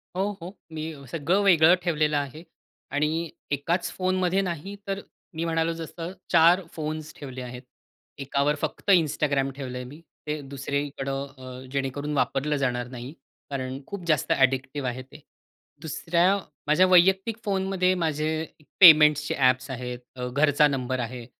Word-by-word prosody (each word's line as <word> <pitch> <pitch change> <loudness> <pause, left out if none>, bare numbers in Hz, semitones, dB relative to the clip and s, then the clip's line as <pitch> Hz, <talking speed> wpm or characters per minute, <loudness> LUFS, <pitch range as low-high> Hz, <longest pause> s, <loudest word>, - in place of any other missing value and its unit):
हो, 185 - 0 0.2
हो. 175 +2 -7 0.2
मी 160 0 -5 0.2
सगळं 170 +5 +1
वेगळं 170 -3 +6
ठेवलेलं 155 -3 +1
आहे. 145 +3 -4 0.5
आणि 155 +3 0 0.2
एकाच 170 +5 -1
फोनमध्ये 185 0 +1
नाही 185 +1 -4
तर 195 0 -2 0.4
मी 165 - -2
म्हणालो 165 0 0
जसं 165 +1 -7 0.2
4 170 +2 +6
फोन्स 155 0 -5
ठेवले 130 -3 -7
आहेत. 125 0 -7 0.6
एकावर 140 +1 0
फक्त - - -4
Instagram 145 -5 +2
ठेवलंय 125 -2 -5
मी. 145 +6 -11 0.3
ते 150 0 -2
दुसरीकडं 140 0 -3
अ 130 -1 -9
जेणेकरून 140 +2 -2
वापरलं 140 +4 0
जाणार 125 -3 -1
नाही. 125 +2 -8 0.4
कारण 130 -1 -4
खूप 195 -4 -7
जास्त 155 -4 +1
ॲडिक्टिव्ह 135 +1 +1
आहे 125 +1 -5
ते. 130 +3 -14 0.6
दुसऱ्या 170 +5 +1 0.3
माझ्या 165 +5 +5
वैयक्तिक 190 +5 +4
फोनमध्ये 190 -2 +1
माझे 155 -3 -1 0.3
एक 150 - -23
पेमेंट्सचे 150 -4 +7
ॲप्स 130 -1 +2
आहेत 125 -1 -5 0.2
अ, 125 -1 -4
घरचा 145 +3 +3
नंबर 130 -2 -2
आहे 120 0 -5
150 Hz, 140 wpm, -26 LUFS, 135-170 Hz, 0.6 s, पेमेंट्सचे